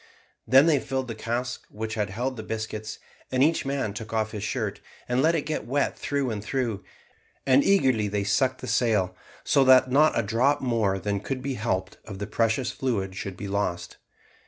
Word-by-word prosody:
Then 130 +5 +7
they 155 -4 +4
filled 130 0 -3
the 115 - -4
cask 120 +3 -4
which 110 +1 -5
had 105 -3 -1
held 125 +7 -3
the 110 - -6
biscuits, 110 0 -5 0.3
and 130 +1 +3
each 155 -2 +2
man 135 -7 -1
took 110 +1 -7
off 110 -1 0
his 105 -2 -5
shirt, 105 -3 -3 0.3
and 125 +1 +1
let 165 +3 +3
it 155 - 0
get 155 -7 -3
wet 140 +3 0
through 140 -3 -1
and 105 -2 -4
through; 115 -4 -2 0.6
and 135 +1 +5
eagerly 130 - +3
they 100 0 -1
sucked 130 +6 +1
the - - -6
sail, 105 -7 +1 0.3
so 140 -3 +4
that 130 0 +6
not 150 +4 +4
a 115 - +2
drop 120 +7 +2
more 115 -6 +1
than 100 +1 -2
could 130 +5 -4
be 135 0 -2
helped 95 -5 -2
of 100 -3 -8
the 100 - -4
precious 115 +3 0
fluid 100 -8 -2
should 95 -1 -6
be 100 - -5
lost. 100 -3 -2
115 Hz, 200 wpm, -26 LUFS, 105-130 Hz, 0.6 s, Then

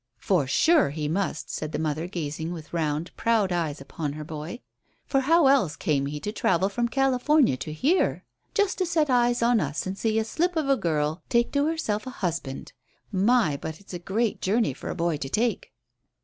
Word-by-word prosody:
"For 175 -9 +1
sure, 315 - +4
he 150 +1 -3
must," 190 +6 -2
said 155 -1 -4
their - - -3
mother, 155 +1 -2
gazing 160 -2 -4
with 165 -2 -8
round, 155 0 -2
proud 220 -5 +2
eyes 160 -4 -1
upon 140 +2 -5
her 155 +1 -6
boy, 155 - -7 0.4
"for 270 - +1
how 325 +4 +4
else 260 - +4
came 140 -3 0
he 150 +1 -4
to 210 - -3
travel 195 -3 +1
from 235 +4 0
California 270 - +3
to 155 - -6
here, 285 - +1 0.3
just 410 -3 +1
to 370 - +1
set 320 -3 +1
his - - +3
eyes 240 -1 +3
on 235 -1 +4
us 150 -3 -2
and 190 +1 -3
see 220 +2 0
a 220 - +1
slip 350 +9 0
of 315 -3 0
a 275 - +4
girl 160 - -1
take 235 -1 +2
to 285 +1 +2
herself 260 -9 -2
a - - -2
husband? 170 - -4 0.4
My, 200 - +3
but 160 +2 -6
it's 200 - -13
a 175 - -4
great 210 +5 -1
journey 215 +4 +1
for - - -7
a - - -3
boy 170 -2 0
to 135 -2 -5
take." 245 - -1
195 Hz, 205 wpm, -26 LUFS, 155-250 Hz, 0.4 s, sure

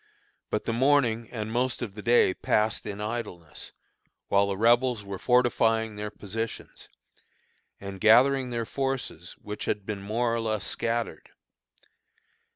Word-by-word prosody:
But 105 - -2
the 115 - -1
morning 120 -3 +2
and 110 -2 -5
most 125 +1 0
of 105 -5 -5
the 105 - -8
day 115 -4 +4
passed 105 +2 0
in 100 -1 -5
idleness, 105 -8 -5 0.6
while 100 0 +4
the 100 -1 -2
Rebels 120 +1 +3
were 100 -1 -6
fortifying 115 -3 +2
their 105 0 -4
positions, 105 +2 -6 0.9
and 100 -1 -8
gathering 125 +4 +5
their 120 -1 -2
forces 130 - -3
which 105 0 -5
had 105 - -2
been 105 -2 -4
more 115 +4 0
or 115 - 0
less 110 -2 -1
scattered. 115 0 -3
110 Hz, 140 wpm, -27 LUFS, 105-120 Hz, 0.9 s, gathering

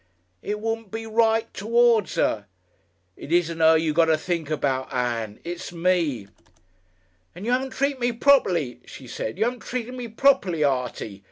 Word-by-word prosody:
"It 210 0 -3
wouldn't 225 -1 -3
be 225 +3 -5
right 225 0 +1
towards 230 0 +2
Her." 105 -2 0 0.7
"It 145 - -10
isn't 170 -1 +1
Her 160 0 +6
you 160 -1 0
got 165 +1 +4
to 160 -1 +3
think 165 -2 -3
about, 135 -4 -1
Ann. 115 -4 -2
It's 175 0 -6
me." 165 - 0 1.1
"And 185 +4 -8
you 240 - 0
'aven't 260 +1 0
treated 275 0 -1
me 245 0 +1
properly," 185 - +2
she 135 - -12
said. 110 -2 -5
"You - - +2
'aven't 245 +1 -2
treated 250 0 -4
me 250 -2 -6
properly, 220 - +2
Artie. 125 -7 -2
175 Hz, 165 wpm, -24 LUFS, 145-230 Hz, 1.1 s, Her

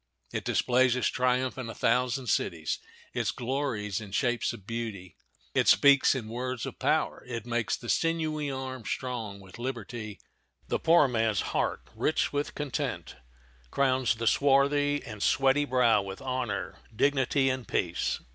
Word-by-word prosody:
It - - -2
displays 125 0 +3
its 125 - +1
triumph 130 +1 0
in 120 -3 -5
a - - -7
thousand 125 +2 +1
cities; 85 -8 -1 0.3
it - - 0
glories 120 -6 -2
in 105 -2 -9
shapes 120 -1 +1
of 110 -5 -11
beauty; 110 -7 -5 0.4
it - - +2
speaks 140 -1 +6
in 120 -5 -4
words 125 +1 -3
of - - -7
power; - - 0
it 115 -3 -5
makes 120 -2 -1
the 120 - -10
sinewy 155 -1 0
arm 130 -2 -5
strong 115 -4 -4
with 95 +3 -13
liberty, 115 -5 -5 0.5
the - - -1
poor 165 -3 +5
man's 115 -4 +1
heart - - 0
rich - - 0
with 145 0 -2
content, 145 -4 -3 0.5
crowns 130 - +2
the 115 +1 -4
swarthy 145 +3 +3
and 110 -3 -8
sweaty 135 +4 +3
brow 125 -5 +3
with 95 0 -7
honor, 130 -1 -3 0.2
dignity, 135 +1 +2
and 130 -3 -5
peace. - - -1
125 Hz, 150 wpm, -29 LUFS, 115-135 Hz, 0.5 s, speaks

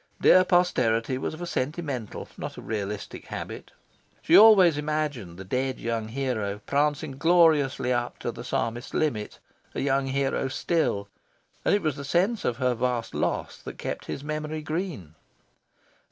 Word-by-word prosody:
Dear 185 - +7
posterity 130 -9 +2
was 155 - -3
of 175 - -7
a - - -2
sentimental, 140 -6 -3
not - - -6
a - - -7
realistic, 105 -2 -5
habit. - - -6 0.5
She - - +4
always 200 -7 +8
imagined 145 - -3
the 95 - -7
dead 130 +6 -2
young 115 -2 -2
hero 110 -5 -2
prancing 145 -1 0
gloriously 155 -6 +4
up 120 0 -2
to 120 - -3
the 120 - -9
Psalmist's 120 0 -3
limit 115 -9 -1 0.4
a - - -2
young 135 0 +1
hero 135 0 0
still; 130 -8 0 0.6
and - - +3
it 205 - -1
was 155 -3 0
the 140 - -6
sense 185 - +1
of 120 - 0
her 125 -1 +1
vast 120 -1 -2
loss - - -2
that - - -9
kept - - -5
his 140 - -5
memory 155 +1 -4
green. 155 - -4
135 Hz, 155 wpm, -26 LUFS, 115-155 Hz, 0.6 s, always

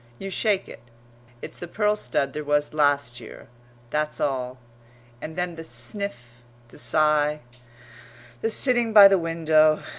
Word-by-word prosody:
You 195 +7 -7
shake 200 0 0
it; - - -12 0.6
it's - - -8
the 175 - -7
pearl 210 +4 0
stud 135 -5 -2
there 150 - -5
was 145 0 0
last 145 -5 +1
year 115 - -13 0.4
that's 150 0 -2
all. 130 -2 -2 0.6
And 160 - -7
then 180 -1 -3
the 165 0 -9
sniff, 120 - -5 0.3
the - - -12
sigh, 150 +4 +1 1.0
the 225 - 0
sitting 240 -1 +2
by 205 -2 +10
the 195 -1 +2
window. 160 -2 +2
155 Hz, 145 wpm, -24 LUFS, 140-190 Hz, 1.0 s, by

